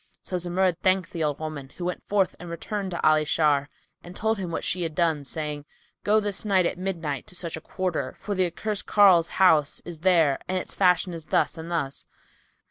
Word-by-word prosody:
So 185 - -3
Zumurrud 180 0 0
thanked 185 -1 +1
the 165 -2 -2
old 145 -2 -1
woman, 155 -4 -6
who 175 - -4
went 180 - -3
forth 200 -2 0
and 175 - -8
returned 195 +4 -4
to 170 - 0
Ali 155 0 +4
Shar 145 -2 +2 0.3
and 175 +1 -11
told 220 -1 0
him 185 -3 -3
what 165 - -3
she 180 - -1
had 165 -2 -3
done, 160 -4 +1
saying, 150 +1 -4 0.4
"Go 215 +1 +4
this 205 -2 -2
night, 195 -4 +3
at 175 - -2
midnight, 165 -8 -3
to 180 - -12
such 170 -2 -4
a 160 - -8
quarter, 185 0 -3
for 205 - -3
the 185 -2 +2
accursed 210 +4 -4
carle's 185 -5 +6
house 160 -6 +4
is 170 -3 -7
there 165 -5 +3
and 185 - -1
its 185 - -4
fashion 180 -1 +3
is 165 -2 -6
thus - - +1
and 165 0 -8
thus. 150 -5 -3
175 Hz, 210 wpm, -26 LUFS, 155-185 Hz, 0.4 s, carle's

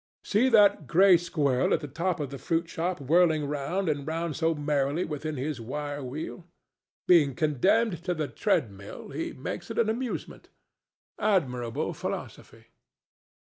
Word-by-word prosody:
See 230 +6 +2
that 205 - +5
gray 185 +4 +6
squirrel 150 -7 +1
at - - -4
the 150 - -5
door 170 +6 -1
of 140 - -6
the 140 - -7
fruit 165 0 -1
shop 175 +1 -2
whirling 155 +1 +3
round 150 +7 -2
and 145 -2 -1
round 165 -1 -2
so 165 0 +1
merrily 145 +2 0
within 155 0 -4
his 135 -1 -3
wire 145 +4 -4
wheel! 155 +6 -6 0.6
Being 150 -7 +5
condemned 170 - +1
to 180 - 0
the 155 -2 -2
treadmill, 100 -7 -2
he 145 +4 -4
makes 175 +6 -6
it - - -6
an 230 -2 +2
amusement. 240 +2 -4 0.7
Admirable 125 - 0
philosophy! - - -7
155 Hz, 145 wpm, -27 LUFS, 140-175 Hz, 0.7 s, gray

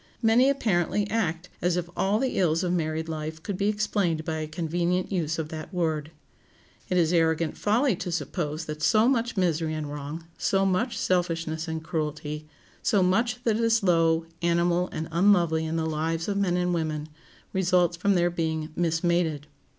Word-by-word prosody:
Many 235 +4 +5
apparently 205 -6 +1
act 180 -6 -1
as 175 0 +1
if 175 -1 -2
all 195 +2 +2
the 260 -1 -1
ills 165 -1 +2
of 180 -1 0
married 160 -1 -1
life 160 0 -5
could 200 - -3
be 200 +2 0
explained 205 -6 0
by 160 -2 -2
a 155 - -3
convenient 175 +3 -1
use 165 -4 -1
of 160 -2 -3
that 155 -1 -7
word. 160 -4 -1 0.8
It 180 - +1
is 170 -1 +3
arrogant 160 -1 +2
folly 230 +3 +2
to 180 - -4
suppose 155 0 -3
that 155 0 -6
so 215 +9 +4
much 240 -4 0
misery 165 -3 +1
and 155 -1 -3
wrong, 150 +3 -6
so 195 0 +2
much 195 +6 0
selfishness 165 -3 -1
and 160 0 -4
cruelty, 150 -1 -4 0.3
so 205 -5 +3
much 230 +6 +1
that 220 -2 +2
is 230 -1 +2
low, 165 -2 +3 0.2
animal, 170 +1 +2
and 160 - -4
unlovely 170 -3 +3
in 160 - -2
the 160 -1 0
lives 160 +1 -1
of 205 - -1
men 190 -3 +1
and 180 0 +1
women, 155 -2 -2 0.5
results 180 -2 +2
from 195 +3 +1
their 175 0 +2
being 160 -2 -2
"mismated." 165 -2 +1
170 Hz, 175 wpm, -26 LUFS, 160-190 Hz, 0.8 s, Many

